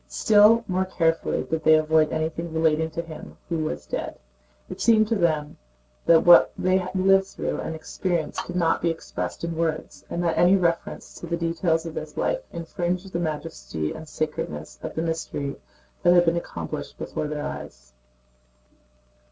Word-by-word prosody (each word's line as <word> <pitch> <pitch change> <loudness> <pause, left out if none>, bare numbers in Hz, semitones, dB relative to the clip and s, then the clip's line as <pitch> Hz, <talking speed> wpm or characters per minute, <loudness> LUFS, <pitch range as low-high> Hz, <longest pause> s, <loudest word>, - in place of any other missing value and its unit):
Still 210 - +5
more 185 0 0
carefully 165 -3 0
did 160 0 -3
they 160 - +7
avoid 155 0 +3
anything 160 +1 -2
relating 160 0 +1
to 165 +1 -4
him 160 -2 -10
who 165 -1 -2
was - - -4
dead. - - -4 0.5
It - - -8
seemed 220 -2 +5
to 230 - +2
them 155 -6 0 0.5
that 165 -1 +6
what 175 0 +8
they 185 0 +2
had 185 0 -4
lived 195 +1 +4
through - - -4
and 160 - -4
experienced 170 +1 -2
could 175 - -7
not 170 -2 +2
be 170 - +2
expressed 165 0 -5
in 170 -1 -2
words, 160 -1 -3
and 175 - -2
that 165 -1 +1
any 180 +2 +6
reference 170 -3 -1
to 170 - -7
the 170 0 -1
details 165 0 0
of 165 - -6
his - - -7
life - - 0
infringed 175 +2 -3
the 170 - -1
majesty 80 - -4
and 160 -1 -8
sacredness 75 - -4
of - - -6
the 160 - -1
mystery 160 -4 -3 0.5
that 175 0 +5
had 175 0 +6
been 165 0 +2
accomplished 170 - -5
before 150 - -4
their 150 0 -4
eyes. - - -8
165 Hz, 175 wpm, -25 LUFS, 155-175 Hz, 0.5 s, what